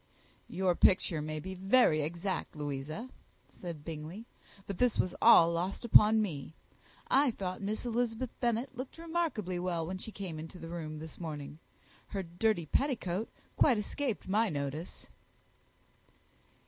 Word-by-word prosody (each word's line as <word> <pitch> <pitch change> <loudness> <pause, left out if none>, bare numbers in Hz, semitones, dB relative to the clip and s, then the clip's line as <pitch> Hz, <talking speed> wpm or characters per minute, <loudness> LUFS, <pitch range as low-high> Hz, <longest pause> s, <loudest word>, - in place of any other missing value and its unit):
"Your 185 -1 +1
picture 175 -3 +3
may 155 0 -3
be 190 +4 -6
very 190 -4 +4
exact, 170 +6 -3
Louisa," 150 - -4 0.4
said 165 -5 -8
Bingley; 165 +7 -6 0.4
"but 200 - -6
this 250 -2 +3
was 185 - +1
all 170 0 +8
lost 180 +7 -2
upon 215 -1 +7
me. 160 -5 -5 0.5
I 280 +1 +4
thought 185 -5 -4
Miss 210 +4 -3
Elizabeth 240 0 -1
Bennet 240 +2 0
looked 255 +4 -7
remarkably 320 - -2
well 175 -2 -1
when 185 +3 -4
she 220 - -6
came 185 -7 -6
into 165 +3 -8
the 165 -1 -8
room 160 -3 -5
this 160 +1 -9
morning. 150 -3 -6 0.5
Her 195 -2 -3
dirty 175 +1 0
petticoat 220 - 0 0.3
quite 255 -6 +5
escaped 230 +2 -2
my 215 +3 +2
notice." 145 +2 -5
185 Hz, 140 wpm, -32 LUFS, 160-225 Hz, 0.5 s, all